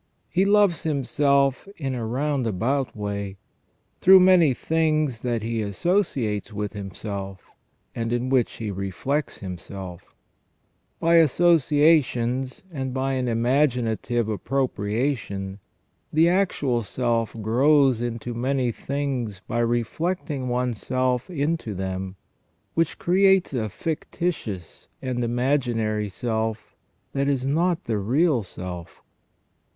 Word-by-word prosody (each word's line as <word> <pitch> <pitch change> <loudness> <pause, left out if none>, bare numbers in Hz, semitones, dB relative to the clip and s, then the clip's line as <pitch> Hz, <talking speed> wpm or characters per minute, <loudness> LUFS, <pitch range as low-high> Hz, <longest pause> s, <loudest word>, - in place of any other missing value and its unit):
He 185 +3 +3
loves 200 -4 +4
himself 140 -1 +1
in 135 -4 -3
a 120 -2 -3
round 135 +1 0
about 125 +7 -1
way, 100 -2 -4 0.6
through 190 +1 +8
many 180 -5 +6
things 155 -6 0
that 120 -3 -1
he 115 0 -1
associates 110 - 0
with 105 -1 -4
himself, 100 -1 -6 0.4
and 115 0 -3
in 120 +1 -1
which 130 -3 +2
he 110 -3 -4
reflects 100 - -2
himself 90 -1 -8 0.8
By 170 +1 +4
associations 145 -5 +3
and 130 -3 -3
by 135 +1 0
an 130 -1 -1
imaginative 120 -2 +1
appropriation, 105 -3 -2 0.5
the 160 +2 +4
actual 160 -10 +1
self 115 +1 -1
grows 130 +3 +3
into 120 0 -3
many 125 +1 0
things 130 -5 -3
by 120 - -1
reflecting 130 +4 -1
one's 125 -2 -1
self 130 +1 0
into 150 - -2
them, 95 0 -4 0.6
which 165 -1 0
creates 190 -1 +3
a 110 -4 -1
fictitious 150 - -4
and 130 -2 -3
imagi 120 +1 +1
nary 110 -2 -1
self 110 +1 -3 0.4
that 140 0 0
is 135 -2 0
not 170 +5 +1
the 110 -3 -1
real 130 - +2
self. 90 -3 -8
125 Hz, 115 wpm, -24 LUFS, 110-145 Hz, 0.8 s, through